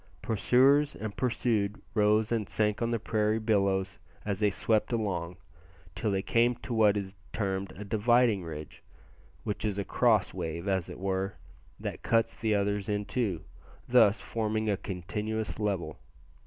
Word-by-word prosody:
Pursuers 135 +7 +3
and 110 -1 -5
pursued 110 -4 0
rose 105 0 +3
and 110 -4 -1
sank 105 0 0
on 115 - +1
the 120 - +1
prairie 110 0 0
billows 100 -3 +1 0.3
as 100 -2 -2
they 105 -1 +3
swept 110 +4 +1
along, 95 -7 -2 0.6
till 95 +4 -2
they 95 -1 0
came 120 +1 +3
to 120 - -6
what 105 -2 +4
is 95 -2 -4 0.2
termed 95 -2 -2
a 105 - -8
"dividing 110 0 +3
ridge," 75 -2 -8 0.6
which 105 - -3
is 105 -2 -1
a 100 - -2
cross 110 -5 +2
wave, 85 0 -4
as 95 -3 0
it - - -8
were, 95 0 -2 0.4
that - - -5
cuts 115 0 +2
the 110 -2 0
others 100 0 0
in 105 0 -1
two, 100 -11 -2 0.4
thus 100 +2 +5
forming 110 -1 -1
a - - +2
continuous 105 +5 -4
level. 100 -4 -2
105 Hz, 155 wpm, -29 LUFS, 95-110 Hz, 0.6 s, thus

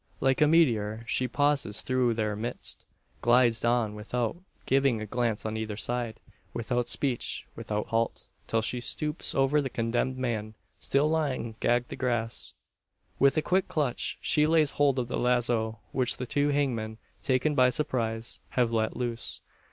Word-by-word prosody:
Like 135 +1 +2
a 150 - +6
meteor 115 -9 +3
she 125 +4 0
pauses 140 -5 +1
through 125 -2 +1
their 105 -2 -1
midst 115 +3 -2 0.4
glides 120 -1 +4
on 120 -3 +2
without 115 +3 -2 0.3
giving 135 -3 +2
a 110 - -4
glance 115 0 -1
on 110 0 -2
either 110 -2 -4
side 120 -1 -2 0.4
without 120 +1 -1
speech, 130 -4 0
without 105 0 -3
halt 115 0 -1 0.2
till 115 -1 +1
she 125 +2 -1
stoops 150 +5 -1
over 135 +2 +3
the 135 - -3
condemned 120 +2 -1
man, 110 -4 -3 0.2
still 140 +2 +2
lying 145 -7 -1
gagged 120 0 +1
the - - -5
grass. 120 -3 -2 0.7
With 140 +3 +4
a 155 - +2
quick 185 +1 +1
clutch 145 -6 -1
she 150 -1 +3
lays 155 -2 +4
hold 140 -2 +2
of 125 -2 -1
the - - -2
lazo; 120 -2 +1
which 125 -2 0
the 125 - -4
two 145 +4 +1
hangmen, 120 -7 -1 0.2
taken 135 +3 +1
by 130 -2 +5
surprise, 115 -4 -2
have 120 -2 +1
let 110 -1 0
loose. 120 -2 -3
120 Hz, 160 wpm, -28 LUFS, 115-135 Hz, 0.7 s, a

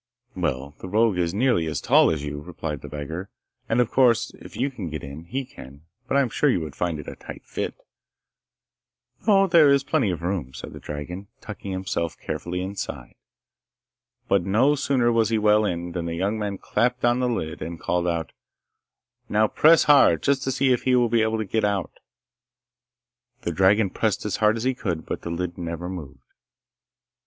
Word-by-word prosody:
'Well, 70 +3 -2
the - - -7
rogue 105 -2 +2
is 85 -1 +1
nearly 100 -5 +1
as 80 - -2
tall - - +5
as 80 -3 -2
you,' 75 0 -5
replied 80 -3 -5
the - - -8
beggar, 80 +6 -6 0.4
'and, 115 - +2
of 120 -2 +2
course, 120 -3 +3
if - - -11
you 135 +2 0
can 100 -10 -6
get 75 -1 -6
in, 70 +4 -8
he 130 +10 -3
can. 70 - -13 0.2
But 135 - +1
I - - +5
am 130 - 0
sure 145 - +2
you 120 - +2
would 75 -4 -7
find 85 -3 -2
it 75 - -9
a - - -6
tight - - -10
fit.' - - -4 1.5
'No, 195 -2 +6
there 165 -5 +6
is 140 0 +4
plenty 135 -7 +1
of 85 -2 -3
room,' 85 -8 -3
said - - -8
the - - -9
dragon, 85 +7 -7
tucking 100 -2 -7
himself 95 -3 -3
carefully 90 +1 -4
inside. 95 +2 -6 1.1
But 100 -2 +2
no 115 +10 +3
sooner 130 -4 +1
was 115 -1 +2
he 115 - +1
well 105 0 +4
in, 85 -2 -3
than 85 -1 -3
the 85 - -3
young 100 +5 -1
man 100 -2 -3
clapped 125 +5 0
on 120 +1 +3
the 125 -1 +1
lid 80 -10 -3
and 85 +1 -5
called 90 0 -1
out, 85 -1 -2 1.0
'Now 110 +1 +3
press 160 +8 +5
hard, 145 -1 +5
just 140 -1 +2
to 130 - 0
see 130 0 +3
if 120 - 0
he 130 -1 +2
will 120 -1 +3
be 115 0 +3
able 110 0 +1
to 110 - -2
get 110 +3 -1
out.' 100 -4 -1 1.4
The - - -1
dragon 95 +1 +3
pressed 110 -4 -1
as 105 -2 -1
hard 110 +1 +3
as 115 - -4
he 130 +1 +1
could, 85 -10 -3
but - - -4
the - - -6
lid 90 +1 -4
never 85 0 -4
moved. 75 -8 -8
100 Hz, 200 wpm, -24 LUFS, 85-120 Hz, 1.5 s, No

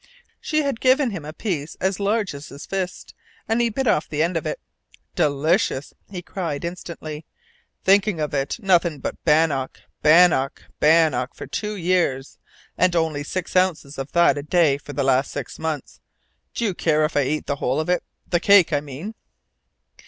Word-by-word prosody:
She 310 -1 0
had 275 -5 -2
given 260 -1 +3
him 185 -6 -6
a 150 - -7
piece 160 -4 -4
as 190 +1 -1
large 205 -2 0
as 140 +1 -9
his 140 +2 -10
fist, 185 -2 -4 0.3
and 225 +2 +1
he 235 - +2
bit 265 +5 -2
off 210 -9 +1
the 150 0 0
end 170 +2 -1
of 165 - -2
it. - - -3 0.5
"Delicious!" 150 +1 +1 0.2
he 180 -3 -7
cried 170 -5 -4
instantly. 165 -3 -7 0.6
"Think 195 +2 +4
of 155 -8 -2
it 140 0 -1
nothing 175 -6 +2
but 135 - -6
bannock, 150 -4 +1 0.2
bannock, 155 -4 +4 0.2
bannock 150 -5 +3
for - - -7
two 210 0 -4
years, 170 -7 0 0.4
and 180 0 +3
only 160 -3 0
six 185 +5 -5
ounces 165 -7 +1
of 135 +1 -5
that 170 -4 +4
a - - -3
day 150 -2 +2
for 145 - -10
the 140 - -1
last 135 0 +2
six 140 -4 -6
months! 155 -4 -4 0.6
Do 235 - -1
you 200 - 0
care 155 -3 +2
if 150 - -4
I 145 - +4
eat 150 +3 -2
the 140 - -2
whole 135 +2 0
of 155 - -2
it 180 0 +1 0.3
the 175 - +1
cake, 190 -3 +5
I 145 - +3
mean?" 150 +9 -7
165 Hz, 180 wpm, -22 LUFS, 145-190 Hz, 0.6 s, cake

